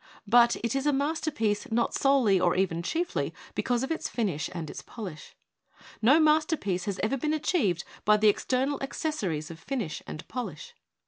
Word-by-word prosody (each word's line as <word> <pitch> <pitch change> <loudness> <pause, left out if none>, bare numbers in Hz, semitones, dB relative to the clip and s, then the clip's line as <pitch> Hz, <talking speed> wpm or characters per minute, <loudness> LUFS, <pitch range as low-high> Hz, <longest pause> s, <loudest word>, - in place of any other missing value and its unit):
But 235 +2 +5
it 235 +2 0
is 270 +2 0
a - - +5
masterpiece 280 -7 0
not 235 +1 +1
solely 260 -9 +3
or 175 -1 +2
even 180 -3 0
rlnYlly 335 - -2 0.2
because 245 0 0
of 270 - -3
h 210 - -2
and 170 -3 -5
its - - -7
ix)lish. 190 -10 -9 0.7
No 245 +6 +6
m, 320 -1 +5
has 205 - +1
ever 245 +6 +1
been 305 +4 0
achieved 215 - +1 0.2
by 210 0 +5
the 215 0 +3
external 260 +6 +1
ac 270 - -4
cessories 185 - -2
of 165 - -10
finish 210 - -4
and 155 - -7
polish. 220 - -6
235 Hz, 170 wpm, -28 LUFS, 185-280 Hz, 0.7 s, No